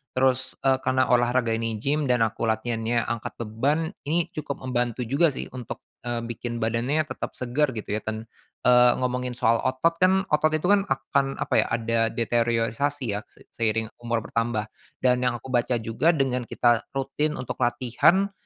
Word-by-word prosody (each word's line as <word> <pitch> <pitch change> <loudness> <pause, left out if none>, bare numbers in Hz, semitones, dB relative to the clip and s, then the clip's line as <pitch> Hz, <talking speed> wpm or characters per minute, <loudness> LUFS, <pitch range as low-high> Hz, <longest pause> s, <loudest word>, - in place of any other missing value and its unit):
terus, 130 0 +1
eee, 135 -1 +3
karena 130 0 +1
olahraga 120 -1 +3
ini 115 0 -1
gym 140 +6 0
dan 125 -2 +3
aku 115 +1 -1
latihannya 115 +1 0
angkat 120 -2 -4
beban, 140 +9 0 0.2
ini 170 +2 0
cukup 140 -3 -5
membantu 125 -1 -1
juga 140 +9 +3
sih 145 - -4
untuk, 125 -3 -7 0.2
eee, 120 -1 -2
bikin 120 0 -4
badannya 120 +7 +1
tetap 150 - -6
segar 130 +2 0
gitu 110 - -5
ya 105 - 0
ten 110 +1 -5 0.4
eee, 125 0 +7
ngomongin 125 -1 -2
soal 115 -1 +2
otot 165 +6 +1
kan, 190 +1 +4
otot 150 +1 +4
itu 155 - -2
kan 200 -1 +3
akan, 135 +1 0
apa - - -3
ya, - - +3
ada 115 0 0
deteriorasi 120 +3 0
ya 105 - -1
se - - -20
seiring 110 -1 -1
umur 115 -1 -2
bertambah 115 -2 -2 0.3
dan 125 -1 +4
yang 125 -1 +1
aku 130 +2 -8
baca 120 0 +1
juga 135 +10 +2
dengan 125 -4 0
kita 120 -2 +2
rutin 140 +3 -1
untuk 125 - -5
latihan, 130 - +2
125 Hz, 170 wpm, -25 LUFS, 115-135 Hz, 0.4 s, eee